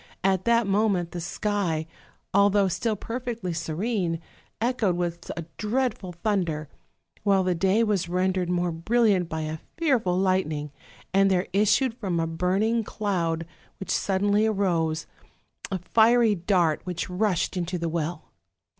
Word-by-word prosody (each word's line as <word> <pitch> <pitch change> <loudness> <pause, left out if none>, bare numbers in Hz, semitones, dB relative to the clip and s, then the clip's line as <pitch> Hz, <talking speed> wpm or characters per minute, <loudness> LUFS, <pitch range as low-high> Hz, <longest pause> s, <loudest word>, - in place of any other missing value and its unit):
at 190 -1 +2
that 235 0 +4
moment 195 -4 +1
the 175 - -5
sky, 175 -3 -1 0.5
although 200 0 +4
still 195 +5 -1
perfectly 230 -4 -4
serene, 170 +2 -1 0.4
echoed 225 -6 +1
with 170 -1 -3
a 170 - -4
dreadful 215 -4 -1
thunder; 170 -5 -1 0.5
while 195 -2 +3
the 185 0 +1
day 190 +6 +2
was 200 -6 0
rendered 185 0 0
more 175 0 0
brilliant 190 +1 +2
by 160 -1 -3
a 155 0 -4 0.2
fearful 245 - +2
lightning, 185 -6 0 0.4
and 195 0 +5
there 185 0 +2
issued 210 +5 +3
from 195 -8 -2
a 165 - +1
burning 190 +8 +1
cloud, 170 -6 -1 0.3
which 195 - -4
suddenly 205 +2 +2
arose, 170 -6 0 0.6
a 190 - -1
fiery 225 +4 +4
dart 175 -4 +1
which 180 -2 -3
rushed 185 0 0
into 180 0 -2
the 170 0 -2
well. 165 0 -3
190 Hz, 135 wpm, -26 LUFS, 170-210 Hz, 0.6 s, and